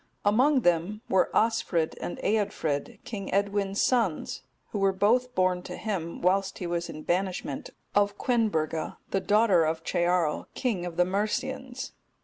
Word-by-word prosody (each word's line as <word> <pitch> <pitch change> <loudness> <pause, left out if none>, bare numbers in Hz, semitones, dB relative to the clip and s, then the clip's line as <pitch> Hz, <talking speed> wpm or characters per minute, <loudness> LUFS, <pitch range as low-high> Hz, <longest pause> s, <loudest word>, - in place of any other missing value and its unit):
Among 255 +7 +4
them 175 +4 +1
were 190 -1 +3
Osfrid 220 -8 +1
and - - -4
Eadfrid, 195 -9 -1
King 200 -4 -5
Edwin's 200 0 +1
sons 230 -11 +1 0.3
who 205 - -2
were 195 0 +4
both 245 +6 +2
born 185 -1 +2
to - - -7
him, 180 -7 -4
whilst 190 +2 +2
he 180 - -5
was 170 0 -2
in 155 - -7
banishment, 180 -6 -2 0.2
of 205 0 +2
Quenburga, 185 -10 0
the 195 - +1
daughter 205 -4 +4
of 160 +1 -1
Cearl, 175 -3 +1
king 205 -9 -1
of 170 - -8
the 180 - +5
Mercians. 245 +7 -2
195 Hz, 145 wpm, -28 LUFS, 175-215 Hz, 0.3 s, the